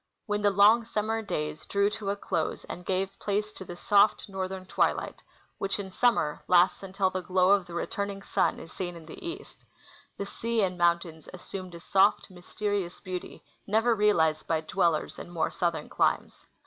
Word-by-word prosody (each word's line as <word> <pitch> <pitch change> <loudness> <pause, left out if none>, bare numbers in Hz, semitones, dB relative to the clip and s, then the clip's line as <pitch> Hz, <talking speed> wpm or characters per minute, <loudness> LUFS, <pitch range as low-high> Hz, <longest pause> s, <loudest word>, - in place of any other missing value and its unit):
When 205 -1 -1
the 205 - +4
long 205 +4 +6
summer 225 0 -1
days 150 -7 -4
drew 200 +1 +2
to 210 -2 -4
a 200 - 0
close 165 -5 -2
and 180 - -8
gave 195 +1 -1
place 210 +1 -1
to - - -8
the 175 -1 -9
soft 205 +3 +3
northern 190 -1 -4
twilight, - - 0 0.4
which 195 +1 -1
in 190 -1 -5
summer 205 -9 +2
lasts 180 +1 +4
until 190 0 0
the 185 - -2
glow 185 +1 +3
of 200 -3 +3
the 170 - -8
returning 200 +3 -3
sun - - +1
is 165 - -11
seen 175 -2 -4
in 165 -1 -11
the 155 - -11
east, 350 +5 -8 0.5
the 200 - -3
sea 230 +2 -1
and 185 -1 0
mountains 170 -2 0
assumed 185 -1 -8
a - - -8
soft, 195 +3 +3
myste 180 +3 -16
rious 195 -4 -1
beauty 185 -1 -6 0.2
never 225 +3 +3
realized 165 -8 +2
by 160 -1 +1
dwellers 170 -1 0
in - - -8
more 170 -2 -1
southern 170 -2 -1
climes. - - 0
190 Hz, 185 wpm, -28 LUFS, 175-205 Hz, 0.5 s, long